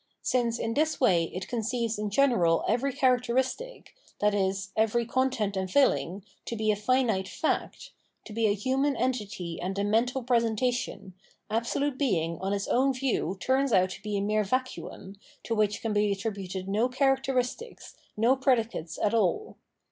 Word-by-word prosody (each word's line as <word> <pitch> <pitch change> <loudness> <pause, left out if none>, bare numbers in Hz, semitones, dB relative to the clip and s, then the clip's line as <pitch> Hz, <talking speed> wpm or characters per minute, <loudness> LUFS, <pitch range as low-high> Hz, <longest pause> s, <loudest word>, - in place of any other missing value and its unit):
Since 240 -2 +1
in 225 0 -2
this 310 +3 +1
way 180 -10 +4
it 185 +3 -6
conceives 230 -1 -2
in 210 0 -2
general 200 -9 +3
every 275 +4 +1
characteristic, 260 - 0 0.3
i.e. 205 -2 +2 0.2
every 225 +2 +2
content 235 -5 0
and 190 -1 -2
filling, 185 - +2 0.2
to 235 - -4
be 215 -1 +1
a - - +1
finite 215 -3 +1
fact, 315 - -2 0.3
to 215 - -9
be 225 0 +2
a 205 - +2
human 265 +6 0
entity 205 -9 -3
and 190 +2 -3
a 200 - 0
mental 240 +5 +1
presentation, 235 -4 0 0.4
absolute 255 +5 -1
Being 170 - 0
on 190 +2 -2
its 200 -1 -1 0.3
view 230 -8 -1
turns 265 +4 +1
out 185 -2 +3
to - - -8
be 210 0 -2
a - - 0
mere 210 +1 +1
vacuum, 210 -4 -4 0.3
to 230 - -2
which 210 -2 0
can 225 -2 -1
be 205 0 +2
attributed 195 -2 -4
no 215 +5 +1
characteristics, 270 - -1 0.2
no 235 +5 +4
predicates 230 - 0
at 210 - 0
all. 230 - 0
225 Hz, 155 wpm, -28 LUFS, 200-255 Hz, 0.4 s, way